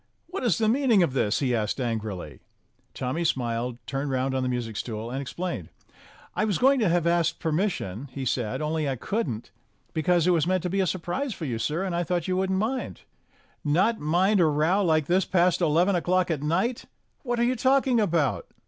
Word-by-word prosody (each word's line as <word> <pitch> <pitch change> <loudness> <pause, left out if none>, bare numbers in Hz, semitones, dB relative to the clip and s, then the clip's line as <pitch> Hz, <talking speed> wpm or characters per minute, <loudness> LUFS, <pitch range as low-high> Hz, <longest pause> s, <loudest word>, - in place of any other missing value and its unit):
"What 355 -4 -5
is 215 -10 +2
the 220 - +1
meaning 235 -5 +4
of 140 - 0
this?" 110 -3 +1
he 130 -3 +1
asked 110 +2 -1
angrily. 105 - -4 0.6
Tommy 130 +7 -2
smiled, 120 -4 -1
turned 140 +1 -3
round 130 0 0
on 130 - 0
the 130 - -1
music 120 -3 -3
stool, 115 +1 -4
and 135 +2 -3
explained. 135 - -5 0.7
"I - - +1
was 210 -4 +1
going 270 +2 +4
to 215 -6 +2
have 170 -1 +1
asked 170 0 +1
permission," 155 - -2
he 135 -2 -5
said, 120 +2 -1
"only 155 -1 -1
I 135 - -1
couldn't, 125 - -3 0.4
because 170 +1 +2
it 180 - +4
was 170 -2 +2
meant 185 -1 +1
to 180 - -2
be 195 - 0
a 190 - +2
surprise 190 - -2
for 165 - -5
you, 120 -5 -3
sir, 155 +9 -1
and 185 -3 -2
I 175 - 0
thought 175 0 -1
you 185 - 0
wouldn't 190 0 0
mind." 235 +6 -2 0.6
"Not 185 +10 +2
mind 180 +7 +2
a 170 - +5
row 155 +7 +2
like 155 -4 +2
this 185 +5 +2
past 180 0 +2
eleven 175 +4 +3
o'clock 180 0 +1
at 150 -4 -1
night! 185 +11 0 0.4
What 245 -3 -2
are - - +3
you 250 +2 +2
talking 260 0 +3
about?" 170 - +1
170 Hz, 205 wpm, -26 LUFS, 130-190 Hz, 0.7 s, a